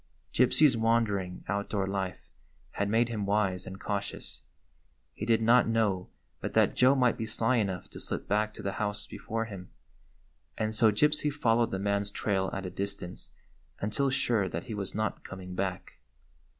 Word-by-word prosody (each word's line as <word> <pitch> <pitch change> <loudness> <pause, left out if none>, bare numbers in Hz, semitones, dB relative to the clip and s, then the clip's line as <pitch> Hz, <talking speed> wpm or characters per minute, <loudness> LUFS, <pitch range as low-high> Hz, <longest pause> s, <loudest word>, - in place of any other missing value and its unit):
Gypsy's 130 +2 +5
wandering, 110 -5 +1
outdoor 100 -1 -1
life 95 -5 -3 0.4
had 100 0 -1
made 115 +2 +3
him 110 -3 -2
wise 100 -3 +1
and 95 +1 -7
cautious. 100 -1 -4 0.7
He 105 - -5
did 115 -1 +3
not 120 +3 +5
know 105 -5 +1 0.3
but - - -5
that - - +4
Joe 130 +2 +5
might 125 -3 +2
be 110 - -2
sly 115 +3 +2
enough 95 -5 -1
to - - -8
slip - - -4
back 105 +1 +1
to - - -8
the 100 - -1
house 105 0 -1
before 115 +1 -4
him, 95 -4 -9 0.9
and 110 0 -1
so 110 0 +5
Gypsy 150 +6 +3
followed 115 -5 +2
the 95 - -2
man's 100 +1 0
trail 95 -2 0
at 95 - -4
a 90 - -4
distance 100 -2 -5 0.5
until 110 +7 0
sure 115 -7 +1
that - - -4
he 120 -4 -6
was 100 -2 -4
not 110 0 -2
coming 95 -1 -8
back. 95 0 -4
105 Hz, 170 wpm, -30 LUFS, 95-115 Hz, 0.9 s, Gypsy's